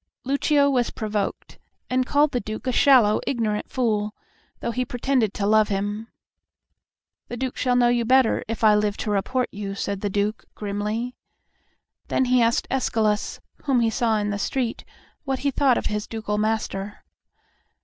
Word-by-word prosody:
Lucio 280 +2 +2
was 250 -4 +1
provoked, 210 -2 -4 0.3
and 255 0 0
called 290 0 +3
the 245 - 0
Duke 215 +2 -6
"a 255 - +1
shallow, 245 -6 +5
ignorant 220 -5 -1
fool," 215 -4 -1 0.4
though - - -2
he 250 +2 -1
pretended 245 -2 0
to 200 - -1
love 215 +1 +4
him. 205 +2 -3 1.2
"The 240 - -6
Duke 260 +1 -3
shall 250 -1 +1
know 245 -1 +4
you 240 -1 +2
better 255 0 +3
if 225 +1 -4
I 215 -1 +7
live 210 0 +1
to 210 - -3
report 245 +6 0
you," 200 -1 -5
said 200 0 -3
the 205 - -1
Duke, 205 +2 -1
grimly. 210 +4 -3 0.9
Then 260 - +1
he 250 0 +3
asked 230 0 +2
Escalus, 220 -5 0 0.3
whom 270 -4 +3
he 230 -1 +2
saw 225 -1 +1
in 210 0 -1
the 205 - -3
street, 240 +2 -2 0.4
what 270 -3 -1
he 280 - +3
thought 265 -2 +3
of - - -3
his 210 0 -2
ducal 215 -2 -3
master. 210 -2 -2
225 Hz, 170 wpm, -24 LUFS, 210-255 Hz, 1.2 s, I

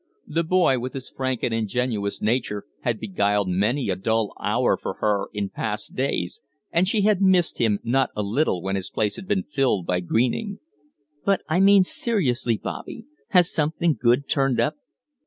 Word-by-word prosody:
The 165 +2 -1
boy, 165 -6 +3
with 125 +1 -5
his 130 -1 -7
frank 130 -2 -3
and 115 - 0
ingenuous 110 -2 -2
nature, 105 -2 -1
had - - -2
beguiled 100 -1 0
many 105 +6 +1
a - - 0
dull 110 +2 0
hour - - +2
for - - -5
her 105 -2 0
in 100 -2 -3
past 105 -1 -4
days, 130 -9 -2 0.3
and 175 +3 +2
she 210 +2 +1
had 205 -1 +3
missed 185 -3 +3
him 110 -3 +2
not 130 +2 +2
a 105 - -1
little 100 - 0
when 95 0 -1
his 95 -1 -4
place 105 -2 -1
had 190 - -9
been 200 -2 +1
filled 130 -11 0
by 90 +1 0
Greening. 125 - 0 0.7
"But 195 -1 +1
I 160 +3 +1
mean 195 0 +6
seriously, 185 - 0
Bobby. 230 - -7 0.2
Has 180 -3 +4
something 160 +1 +1
good 125 +4 +3
turned 135 -4 +1
up?" 120 - +1
125 Hz, 175 wpm, -24 LUFS, 105-170 Hz, 0.7 s, mean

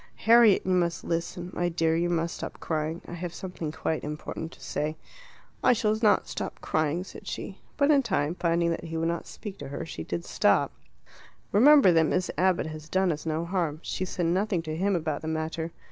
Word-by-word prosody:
"Harriet, 230 -3 +7
you 185 - 0
must 175 -2 +1
listen. 175 +1 -3
My 175 0 0
dear, 165 -1 +1
you 170 +1 +1
must 170 -1 -1
stop - - -7
crying. 160 +1 -2
I - - -7
have 175 0 -5
something 180 -5 -5
quite 160 0 -2
important 150 +2 -5
to - - -16
say." 155 +1 -3 0.7
"I - - +6
shall 215 -2 +1
not 210 -3 +4
stop - - -5
crying," 155 +3 0
said - - -12
she. - - -6 0.2
But 285 +1 +4
in 285 -2 +5
time, 150 - 0
finding 170 -1 +1
that 165 - -3
he 165 0 -4
would 165 +1 0
not 170 0 -3
speak 205 -3 -8
to 140 - -6
her, 140 +4 -5
she 80 - -6
did 85 +1 -4
stop. - - +2 0.8
"Remember 265 0 +7
that 165 -2 +4
Miss 185 +3 0
Abbott 185 -1 +2
has 155 0 -8
done 190 0 +2
us 155 +1 -5
no 160 +1 -1
harm. 170 -4 -1
She - - -3
said 175 -1 -2
nothing 180 0 +1
to 155 -1 -4
him 195 +3 +1
about 155 -4 -2
the 160 - -6
matter. 160 +1 -2
170 Hz, 205 wpm, -27 LUFS, 160-185 Hz, 0.8 s, Harriet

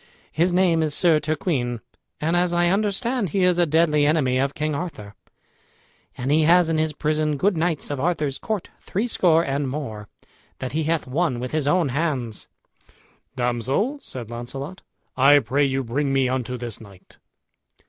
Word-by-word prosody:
His 170 +3 +1
name 175 -2 +3
is 155 -2 -1
Sir 165 -4 +4
Turquine, 145 -5 -2 0.4
and, 165 +3 0
as 175 0 +1
I 175 0 +3
understand, 210 +3 0
he 190 +4 0
is 180 -1 +3
a 175 - +3
deadly 155 -1 +3
enemy 145 -4 +2
of 140 +1 0
King 155 0 -1
Arthur, 140 - -6 1.0
and 130 +3 -2
he 155 +2 +4
has 170 +2 +5
in 160 -1 +1
his 155 0 +1
prison 150 0 -1
good 195 +7 +2
knights 160 -3 -1
of 145 - -3
Arthur's 150 -3 -1
court, 215 -5 -3
threescore 180 -6 +1
and 140 0 -1
more, 110 -7 -5 0.5
that 130 - -5
he 155 +1 -1
hath 160 -1 0
won 135 -1 -1
with 125 +1 -4
his 155 -2 -1
own 170 -1 +2
hands." 130 - -2 0.9
"Damsel," 130 - -1
said 120 - -8
Launcelot, 135 +9 -7 0.3
"I 140 +3 +6
pray 140 +1 +1
you 135 0 -1
bring 135 +4 -1
me 135 -1 +2
unto 125 0 -2
this 120 -3 -6
knight." 100 -4 -16
150 Hz, 170 wpm, -23 LUFS, 130-170 Hz, 1.0 s, I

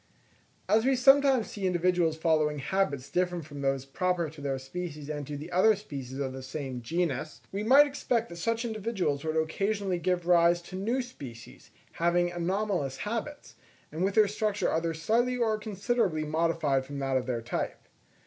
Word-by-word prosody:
As 220 +1 +4
we 265 +1 +3
sometimes 270 -2 +5
see 195 -2 -2
individuals 175 -2 +2
following 155 -2 +2
habits 145 -3 -1
different 175 +1 -1
from 145 -1 -8
those 135 -1 0
proper 170 +2 -1
to 155 -2 -12
their 140 -1 -1
species 150 +2 -6
and 145 -2 -5
to 145 -1 -5
the 155 +5 -8
other 200 +5 +5
species 135 -10 -7
of 135 -2 -2
the 130 - -7
same 130 -2 -5
genus, 155 +1 -2
we 200 - -3
might 265 +7 +7
expect 245 -5 -1
that 170 - -9
such 230 +5 -1
individuals 210 -10 -2
would 160 0 -1
occasionally 195 +3 0
give 175 0 0
rise 175 0 +5
to 185 - -9
new 230 +7 0
species, 130 - -11 0.2
having 175 +1 +1
anomalous 175 -5 -1
habits, 230 - -5 0.4
and 160 +4 -2
with 195 +1 0
their 215 -2 +6
structure 210 -1 0
either 165 0 0
slightly 235 +9 +1
or 220 -3 +1
considerably 210 -5 0
modified 155 -3 +1
from 140 +2 -7
that 135 -1 -1
of 130 -1 0
their 120 -3 -2
type. 120 - -4
175 Hz, 175 wpm, -29 LUFS, 145-210 Hz, 0.4 s, might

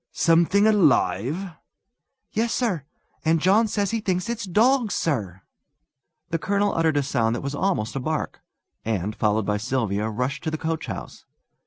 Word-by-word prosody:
"Something 170 +5 +3
alive?" 165 - +2 0.8
"Yes, 230 +2 0
sir. 190 - -1 0.4
And 160 +1 +3
John 200 +7 +4
says 205 -1 -1
he 225 - 0
thinks 185 0 -1
it's 230 -3 -3
dogs, 230 +4 +2
sir!" 100 - -2 0.9
The 165 -1 -1
colonel 200 +4 +1
uttered 160 -2 +1
a 145 - +2
sound 120 -4 0
that - - -4
was 140 +1 -4
almost 145 - -1
a - - -1
bark, 155 +4 -3 0.4
and, 105 -2 -2
followed 105 0 +1
by 105 +1 0
Sylvia, 110 -3 -1
rushed 125 +5 -3
to - - +1
the 155 - -3
coachhouse. 160 +1 -5
160 Hz, 155 wpm, -24 LUFS, -, 0.9 s, John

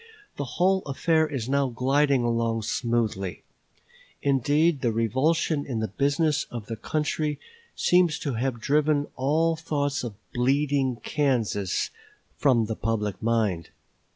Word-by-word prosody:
The 145 - -3
whole 190 +1 +3
affair 160 +3 +2
is 135 -6 -4
now 140 0 +2
gliding 135 +2 +2
along 115 -1 0
smoothly. 110 - -1 0.8
Indeed, 145 +3 +2
the 120 - +1
revulsion 145 +7 +1
in 125 -5 -4
the 110 0 -2
business 145 - +1
of 115 -3 -6
the 115 - -5
country 150 +4 -2 0.4
seems 175 -4 +3
to 140 - -2
have 120 +1 -2
driven 145 +3 +2
all 160 +5 +1
thoughts 145 -4 -2
of 115 -4 -5 0.2
"bleeding 135 +1 +1
Kansas" 115 -9 0 0.4
from 125 -6 +3
the 110 +1 -3
public 105 -2 -2
mind. 110 -7 0
135 Hz, 125 wpm, -26 LUFS, 115-150 Hz, 0.8 s, whole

